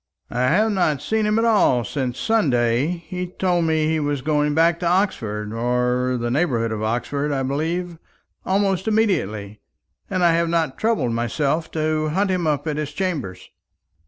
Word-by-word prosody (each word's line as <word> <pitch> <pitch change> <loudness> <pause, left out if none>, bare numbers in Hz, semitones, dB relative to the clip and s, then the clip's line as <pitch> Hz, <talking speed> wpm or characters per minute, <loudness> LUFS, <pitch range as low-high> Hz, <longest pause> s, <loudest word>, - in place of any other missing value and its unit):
"I 125 +2 +1
have 215 +10 +3
not 165 -8 +1
seen 215 +9 0
him 210 +1 +2
at 225 - +2
all 205 - +3
since 125 +1 -3
Sunday. 130 - +2 0.2
He 180 -1 -4
told 175 -1 0
me 160 -1 +1
he 160 0 +1
was 145 -3 -2
going 150 0 +1
back 165 +1 +3
to 175 - -1
Oxford 110 - -1
or 125 +2 0
the 120 0 -2
neighbourhood 125 -6 0
of 110 -1 -3
Oxford, 125 +6 -1
I 135 -2 -1
believe 165 +5 -2 0.4
almost 195 0 0
immediately; 110 - 0 0.5
and 185 -2 0
I 170 - +5
have 170 0 +1
not 165 -5 0
troubled 220 - +1
myself 140 +7 -1
to 155 -1 0
hunt 190 +5 0
him 180 -3 0
up 145 -1 0
at 150 -1 -2
his 150 -2 -4
chambers." 140 - -4
155 Hz, 170 wpm, -22 LUFS, 125-180 Hz, 0.5 s, I